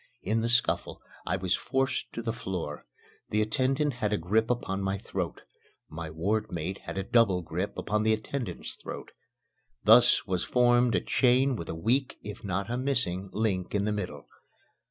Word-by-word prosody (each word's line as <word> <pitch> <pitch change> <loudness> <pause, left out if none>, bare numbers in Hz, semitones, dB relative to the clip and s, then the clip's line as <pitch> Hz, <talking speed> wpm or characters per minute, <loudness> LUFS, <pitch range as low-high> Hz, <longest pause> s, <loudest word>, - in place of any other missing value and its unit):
In 110 +4 +1
the 115 - 0
scuffle 125 0 +1 0.3
I 90 - +1
was 95 0 0
forced 135 0 -1
to 115 - -4
the 115 -1 -1
floor. 90 -10 -5 0.4
The 105 0 +2
attendant 135 +5 +1
had 105 -1 +1
a 105 - +2
grip 110 +7 +1
upon 100 -5 -1
my 95 0 -1
throat. - - -4 0.5
My 80 +1 -6
wardmate 90 +1 -2
had - - -7
a 95 - 0
double 100 -4 +3
grip 85 +5 -3
upon 105 0 0
the 110 0 +3
attendant's 110 -3 -4
throat. - - -8 0.7
Thus - - +6
was 90 -2 -1
formed 120 -1 +4
a - - +2
chain 130 +1 +3
with 85 -7 -6
a - - -3
weak, 125 +10 +1
if 105 -1 -8
not 95 0 -2
a 120 +1 -2
missing, 110 -9 -1
link 100 -4 -1
in 100 0 +1
the 105 - +1
middle. 90 -9 -4
105 Hz, 175 wpm, -29 LUFS, 95-120 Hz, 0.7 s, Thus